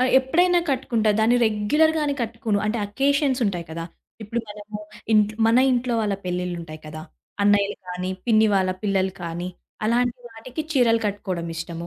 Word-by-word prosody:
ఆహ్, 255 Hz, 0 st, +3 dB
ఎప్పుడైనా 350 Hz, +7 st, +3 dB
కట్టుకుంటా. 235 Hz, -5 st, +1 dB
దాన్ని 230 Hz, +3 st, +4 dB
రెగ్యులర్‌గానే 295 Hz, +8 st, +2 dB
కట్టుకోను. 225 Hz, -2 st, -1 dB
అంటే 225 Hz, +2 st, 0 dB
అకేషన్స్ 275 Hz, +4 st, +1 dB
ఉంటాయి 175 Hz, -4 st, -2 dB
కదా! 165 Hz, +1 st, -5 dB, 0.4 s
ఇప్పుడు 230 Hz, +3 st, -2 dB
మనము 210 Hz, 0 st, -8 dB, 0.3 s
ఇంట్ 210 Hz, -1 st, +4 dB, 0.2 s
మన 230 Hz, +2 st, +5 dB
ఇంట్లో 245 Hz, -1 st, 0 dB
వాళ్ళ 210 Hz, -2 st, 0 dB
పెళ్ళిళ్ళుంటాయి 175 Hz, -3 st, -4 dB
కదా! 155 Hz, +1 st, -7 dB, 0.4 s
అన్నయ్యలు 205 Hz, 0 st, +3 dB
గాని, 180 Hz, +1 st, -3 dB, 0.2 s
పిన్ని 220 Hz, -2 st, +5 dB
వాళ్ళ 190 Hz, -1 st, +2 dB
పిల్లలు 190 Hz, -2 st, +1 dB
కానీ, 170 Hz, +1 st, -4 dB, 0.4 s
అలాంటి 245 Hz, +2 st, +1 dB
వాటికి 245 Hz, +7 st, -6 dB
చీరలు 235 Hz, -5 st, +3 dB
కట్టుకోవడమిష్టము. 170 Hz, -4 st, -4 dB
215 Hz, 140 wpm, -23 LUFS, 185-245 Hz, 0.4 s, మన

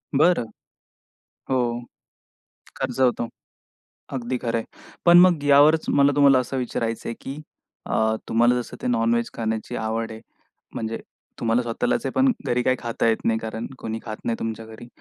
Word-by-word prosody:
बरं. 160 Hz, -2 st, +4 dB, 1.0 s
हो. 120 Hz, -2 st, 0 dB, 1.0 s
खर्च 130 Hz, -1 st, -3 dB
होतो. 125 Hz, -2 st, +2 dB, 0.9 s
अगदी 125 Hz, -1 st, -2 dB
खरं 115 Hz, -1 st, -1 dB
आहे. 115 Hz, -, -6 dB, 0.4 s
पण 175 Hz, 0 st, +8 dB
मग 175 Hz, -5 st, +5 dB
यावरचं 145 Hz, +3 st, +5 dB
मला 140 Hz, 0 st, +5 dB
तुम्हाला 140 Hz, -2 st, +6 dB
असं 125 Hz, +1 st, -3 dB
विचारायचंय 115 Hz, -2 st, -3 dB
की? 135 Hz, -, -6 dB, 0.5 s
अ, 110 Hz, 0 st, +1 dB
तुम्हाला 120 Hz, +2 st, +3 dB
जसं -, -, -10 dB
ते -, -, -2 dB
नॉन-व्हेज 115 Hz, 0 st, +1 dB
खाण्याची 110 Hz, +1 st, -3 dB
आवड 110 Hz, 0 st, -2 dB
आहे, 110 Hz, 0 st, -9 dB, 0.5 s
म्हणजे 115 Hz, 0 st, -3 dB, 0.4 s
तुम्हाला 115 Hz, +1 st, +2 dB
स्वतःलाच 120 Hz, -, -1 dB
आहे. -, -, -1 dB
पण 265 Hz, 0 st, +4 dB, 0.2 s
घरी 120 Hz, 0 st, +1 dB
काही 130 Hz, -, +3 dB
खाता 115 Hz, -1 st, -1 dB
येत 115 Hz, -, +3 dB
नाही. 110 Hz, -1 st, +2 dB
कारण 110 Hz, +1 st, -5 dB
कोणी 110 Hz, -2 st, -4 dB
खात 110 Hz, -2 st, -6 dB
नाही 115 Hz, -, 0 dB
तुमच्या 115 Hz, 0 st, -4 dB
घरी. 110 Hz, +2 st, -11 dB
120 Hz, 155 wpm, -23 LUFS, 115-135 Hz, 1.0 s, पण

